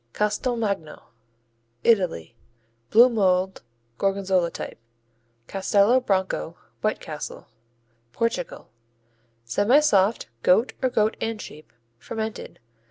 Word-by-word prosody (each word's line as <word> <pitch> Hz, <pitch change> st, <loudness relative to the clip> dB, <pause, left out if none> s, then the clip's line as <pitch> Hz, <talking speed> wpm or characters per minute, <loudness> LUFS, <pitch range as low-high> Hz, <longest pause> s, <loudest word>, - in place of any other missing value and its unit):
Castelmagno 210 Hz, -5 st, -1 dB, 0.8 s
Italy 180 Hz, -, +1 dB, 0.5 s
Blue 235 Hz, +3 st, +7 dB
mold, 190 Hz, -5 st, +1 dB, 0.4 s
Gorgonzola 195 Hz, -3 st, +1 dB
type. -, -, -7 dB, 0.7 s
Castelo 200 Hz, +5 st, +3 dB
Branco, 190 Hz, -, -1 dB, 0.2 s
White -, -, 0 dB
Castle -, -, -7 dB, 0.6 s
Portugal 230 Hz, -, -3 dB, 0.7 s
Semisoft; 205 Hz, -, +3 dB, 0.2 s
goat 220 Hz, -, +3 dB
or 260 Hz, -, +2 dB
goat 215 Hz, -2 st, +1 dB
and 225 Hz, -1 st, -2 dB
sheep; 155 Hz, -6 st, -11 dB, 0.3 s
fermented. 220 Hz, -, -6 dB
200 Hz, 85 wpm, -24 LUFS, 185-225 Hz, 0.8 s, Blue